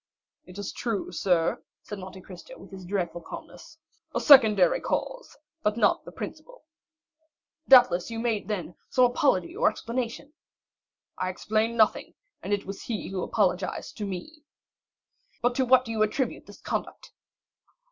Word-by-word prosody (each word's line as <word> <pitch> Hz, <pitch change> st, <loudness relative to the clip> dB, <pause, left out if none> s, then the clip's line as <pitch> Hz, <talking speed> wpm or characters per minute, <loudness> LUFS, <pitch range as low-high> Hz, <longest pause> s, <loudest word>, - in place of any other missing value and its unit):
"It 180 Hz, +1 st, -12 dB
is 205 Hz, -1 st, -4 dB
true, 225 Hz, -6 st, -3 dB
sir," 170 Hz, -1 st, +1 dB, 0.2 s
said 210 Hz, -, -7 dB
Monte 190 Hz, 0 st, -9 dB
Cristo 195 Hz, -, -12 dB
with -, -, -14 dB
his 190 Hz, -1 st, -10 dB
dreadful 175 Hz, -2 st, -3 dB
calmness; -, -, -11 dB, 0.4 s
"a -, -, +2 dB
secondary 215 Hz, -, +6 dB
cause, -, -, -4 dB, 0.2 s
but 210 Hz, +1 st, 0 dB
not 215 Hz, -, +2 dB
the -, -, -9 dB
principal." -, -, -9 dB, 1.0 s
"Doubtless 240 Hz, -9 st, +6 dB
you 230 Hz, -, -5 dB
made, 225 Hz, -2 st, -1 dB
then, 185 Hz, -5 st, -4 dB, 0.2 s
some 255 Hz, -, +4 dB
apology 245 Hz, -, +1 dB
or -, -, +3 dB
explanation?" 245 Hz, +4 st, -5 dB, 0.9 s
"I 185 Hz, -, -1 dB
explained 220 Hz, +5 st, -1 dB
nothing, 220 Hz, -1 st, +2 dB, 0.3 s
and -, -, -6 dB
it 200 Hz, -1 st, -1 dB
is 195 Hz, 0 st, -6 dB
he 225 Hz, -4 st, -4 dB
who 190 Hz, -1 st, -3 dB
apologized 185 Hz, -3 st, -1 dB
to 205 Hz, -, -3 dB
me." 305 Hz, -, -7 dB, 1.0 s
"But 245 Hz, +1 st, +1 dB
to 260 Hz, -, +2 dB
what 255 Hz, +1 st, +5 dB
do 225 Hz, -, -5 dB
you 220 Hz, -1 st, -2 dB
attribute 215 Hz, +5 st, -1 dB
this -, -, -14 dB
conduct?" -, -, -5 dB
210 Hz, 150 wpm, -27 LUFS, 185-245 Hz, 1.0 s, secondary